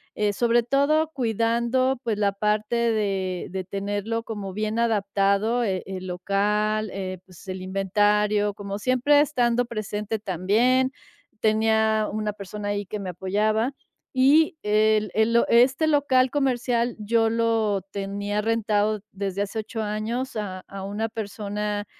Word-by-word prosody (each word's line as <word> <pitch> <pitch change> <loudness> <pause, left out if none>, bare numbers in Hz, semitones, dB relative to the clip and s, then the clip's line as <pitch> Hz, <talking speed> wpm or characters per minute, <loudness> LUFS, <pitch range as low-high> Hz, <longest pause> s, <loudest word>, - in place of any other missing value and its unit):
eh, 210 -1 +1
sobre 235 +2 +3
todo 280 +6 +2
cuidando, 235 +2 +1
pues, 225 -3 -1
la 200 -1 +1
parte 210 +2 0
de 200 -6 0
de 190 +1 -4
tenerlo 205 +4 -3
como 205 -4 -5
bien 215 +3 -2
adaptado, 205 +1 +1
eh, 190 -4 -1
el 185 -1 -6
local, 210 +4 0
eh, 185 -2 -5
pues, 185 +1 -16
el 185 0 -5
inventario, 205 +2 +1
como 200 0 -6
siempre 255 +5 +3
estando 245 -5 +2
presente 215 -1 -4
también. 220 +8 +2 0.5
Tenía 220 0 +2
una 215 0 -2
persona 205 +1 -6
ahí 205 0 -2
que 210 +3 -5
me 195 -2 -5
apoyaba. 215 +7 0 0.4
Y 300 +6 +4
el 215 0 +2
el 220 +1 +2
lo 235 - +4
este 265 +6 +4
local 265 -4 +3
comercial 245 -4 0
yo 225 +1 +2
lo 225 -3 +1
tenía 200 +1 -2
rentado 215 -1 +1
desde 195 0 -3
hace 205 +2 -4
8 220 +1 -4
años 220 +5 -3
a 200 -4 -4
a 195 -1 -7
una 205 +3 -2
persona, 210 -1 -4
215 Hz, 140 wpm, -24 LUFS, 200-235 Hz, 0.5 s, Y